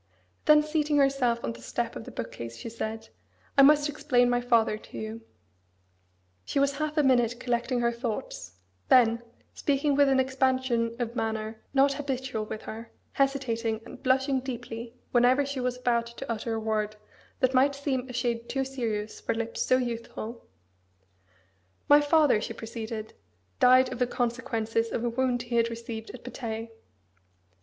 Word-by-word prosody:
Then 300 0 +7
seating 300 -1 +1
herself 270 -4 +2
on 115 - -2
the 115 - -13
step - - -3
of - - -7
the - - -9
book - - -5
case, 115 0 -7
she 230 - -6
said, 225 0 -5 0.5
"I 275 - +7
must 295 +1 +6
explain 275 -5 +2
my 245 0 +2
father 235 -3 +3
to 215 - -11
you." 220 +1 -5 1.2
She 100 - -4
was 280 +1 +1
half 305 0 -2
a 300 - +4
minute 245 -3 +3
collecting 245 0 0
her 235 0 +2
thoughts: 235 - -5 0.4
then, 235 -2 +5 0.3
speaking 285 +1 +1
with 285 0 +5
an 265 -1 +3
expansion 260 -3 +1
of 240 -1 -3
manner 220 0 -3
not 275 +1 +5
habitual 260 -5 -3
with 215 0 -6
her, 225 +1 -8 0.2
hesitating, 235 -5 0
and 255 - -11
blushing 265 +1 +2
deeply, 240 -2 -6 0.2
whenever 250 +3 +4
she 280 -1 -4
was 250 0 -1
about 235 -2 +1
to 235 +3 -8
utter 225 0 -2
a - - -1
word 215 -1 -1 0.4
that 255 0 +2
might 275 +2 +4
seem 270 -2 -2
a - - -7
shade 235 -1 -2
too 270 0 -1
serious 225 -5 -3
for - - -1
lips 230 0 -3
so 255 - +3
youthful: 235 -1 -5 1.4
"My 290 0 +7
father," 290 -6 +4
she 230 - -4
proceeded, 225 -1 -6 0.5
"died 255 0 +6
of 250 - -7
the 250 - +2
consequences 230 -2 -1
of 230 - -2
a 240 - +1
wound 245 0 0
he 240 0 -2
had 230 0 +3
received 230 -1 -6
at 250 - -10
Patay. 225 -2 -5
245 Hz, 165 wpm, -28 LUFS, 230-265 Hz, 1.4 s, Then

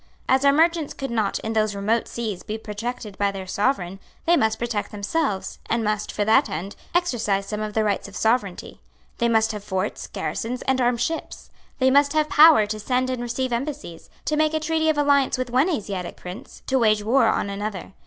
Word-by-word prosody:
As 265 +1 +3
our 280 - +6
merchants 325 +1 +2
could 270 -3 -5
not, 220 -4 0
in 220 - -3
those 215 -2 +1
remote 215 +4 0
seas, 220 -6 -4
be 215 - -5
protected 215 0 -6
by 200 0 +2
their 195 -1 -6
Sovereign, 195 -2 -1 0.3
they 345 - +5
must 220 -7 +2
protect 230 -3 -2
themselves, 210 +1 -2
and 230 0 0
must, 210 -1 -1
for 205 - -1
that 225 +7 +4
end, 180 +6 -5 0.2
exercise 225 - +1
some 210 +1 -4
of 215 -1 -4
the 220 - +2
rights 205 -1 -1
of 200 - -12
sovereignty. 220 -5 -1 0.4
They 235 -1 +2
must 220 -1 +3
have 210 -2 -6
forts, 190 0 -3
garrisons 245 +2 -4
and 265 -1 +1
armed 245 -1 +1
ships. 320 +6 -4 0.3
They 260 -1 +3
must 285 +1 +4
have 310 -1 +1
power 305 -8 +7
to 215 +1 -4
send 255 +4 0
and 255 -2 -3
receive 240 +1 -2
embassies, 265 - -5 0.2
to 305 - 0
make 310 +1 +2
a - - +1
treaty 315 0 0
of 310 - +1
alliance 285 -3 +3
with 255 -1 -3
one 260 +8 +3
Asiatic 195 - -4
prince, 180 +8 -10
to 265 -1 +1
wage 215 -3 +3
war 235 +2 +3
on 200 -2 0
another. 200 -2 -5
230 Hz, 205 wpm, -23 LUFS, 205-270 Hz, 0.4 s, power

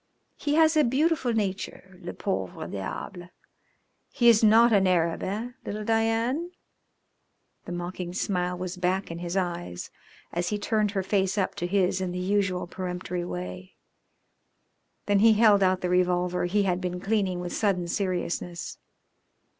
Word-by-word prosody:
He 290 0 -1
has 320 0 +5
a 305 - +5
beautiful 270 +1 +1
nature, 195 -3 -3
le 175 - -6
pauvre 175 -4 -3
diable. 175 - -6 0.8
He 235 -2 +4
is 225 -1 +5
not 225 +2 +6
an 195 -2 +4
Arab, 170 -2 +1
eh, 220 +6 -3
little 210 +1 -4
Diane?" 230 +9 0 1.1
The - - -7
mocking 175 0 -4
smile 180 -2 -1
was 180 0 -5
back 185 +1 -1
in 165 - -6
his 175 +2 -3
eyes 175 - -3 0.4
as 175 +1 -1
he 210 - -1
turned 210 0 0
her 190 - +1
face 195 +1 0
up 195 - 0
to 175 - -3
his 185 0 +1
in 180 -1 -2
the - - -4
usual 185 -1 0
peremptory 180 0 -4
way. 180 +1 -6 1.3
Then 205 -1 +3
he 225 +2 +6
held 210 -2 +5
out 185 0 +2
the 180 - -1
revolver 180 0 +1
he 200 +3 +1
had 185 -1 0
been 180 -1 -3
cleaning 195 -2 0
with 175 0 -5
sudden 185 -5 0
seriousness. 175 -2 -3
185 Hz, 155 wpm, -27 LUFS, 180-210 Hz, 1.3 s, not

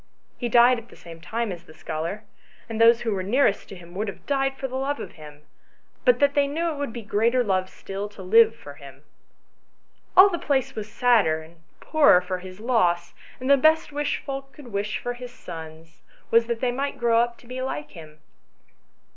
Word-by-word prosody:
He 240 - -2
died 240 +1 +5
at 230 +1 -17
the - - -15
same 165 -1 -12
time 225 +5 -3
as 175 -2 -8
the 155 - -16
scholar, 165 +7 -5 0.4
and 225 -1 -3
those 230 +1 +6
who 225 - -1
were 190 - -2
nearest 205 +2 +1
to - - -8
him 175 -1 -13
would 210 +4 -3
have 200 - -8
died 270 -1 0
for 265 - -3
love 270 +3 -2
of - - -7
him, 150 -1 -14 0.6
but - - +5
that 285 -1 +3
they 285 -1 +2
knew 330 +4 -1
it 300 - -6
would 285 -4 -3
be 235 0 -7
greater 230 +4 +2
love 185 -3 0
still 195 +2 -6
to 205 -2 -11
live 225 +4 +5
for 145 -10 -11
him. 140 -1 -14 1.1
All 375 +2 +10
the 350 -4 -2
place 270 -2 0
was 215 -2 -7
sadder 200 -11 +3
and 165 +2 -17 0.2
poorer 300 - +5
for 180 0 -4
his 185 +1 -11
loss, 180 -8 +1 0.3
and 255 - -5
the 280 0 +6
best 315 +3 +3
wish 290 0 -1
folk 275 -1 -6
could 280 -5 -13
wish 205 0 -3
his 250 0 -8
sons 165 -6 -11 0.3
was 230 0 +4
that 235 -1 -3
they 250 -2 +1
might 275 +3 -3
grow 230 -1 +3
up 235 0 0
to - - -20
be 255 +2 -6
like 150 - -4
him." 155 -2 -13
230 Hz, 205 wpm, -24 LUFS, 180-265 Hz, 1.1 s, All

